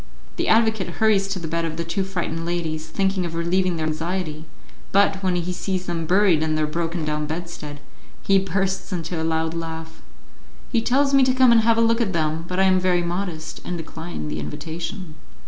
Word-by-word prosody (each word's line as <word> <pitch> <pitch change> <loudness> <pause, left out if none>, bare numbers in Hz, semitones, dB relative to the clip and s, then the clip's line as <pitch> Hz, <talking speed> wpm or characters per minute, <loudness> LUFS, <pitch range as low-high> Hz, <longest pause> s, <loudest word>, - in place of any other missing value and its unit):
The - - -1
advocate 220 -5 +2
hurries 210 -3 +3
to 195 0 -2
the 170 -3 -5
bed 165 +1 -1
of 160 -1 -3
the 170 - -1
two 170 +4 -1
frightened 175 -4 -3
ladies, 165 -2 -2
thinking 190 +2 0
of 170 -1 -4
relieving 180 +2 +1
their 160 - -1
anxiety, 160 0 -3 0.5
but, 200 -1 +3
when 185 -2 +1
he 175 +1 -1
sees 185 0 -2
them 165 -2 -3
buried 185 -3 +4
in 155 0 +1
their 155 0 +2
broken 165 +1 -2
down 150 0 -1
bedstead, 155 -2 -6 0.4
he 195 0 +4
bursts 190 +1 -1
into 170 -2 -3
a - - -1
loud 160 0 0
laugh. 160 -1 -6 0.7
He 230 - +2
tells 275 +4 +2
me 275 - +6
to 255 0 +2
come 255 -2 +6
and 230 -1 +6
have 225 0 +3
a - - +4
look 230 +1 +3
at 200 -5 0
them, 160 0 0
but 180 +1 -2
I - - +5
am 185 -1 +4
very 180 -1 +2
modest, 170 -2 -4
and 180 - -3
decline 160 - -6
the 75 +1 -3
invitation. 165 - -5
175 Hz, 205 wpm, -23 LUFS, 160-195 Hz, 0.7 s, me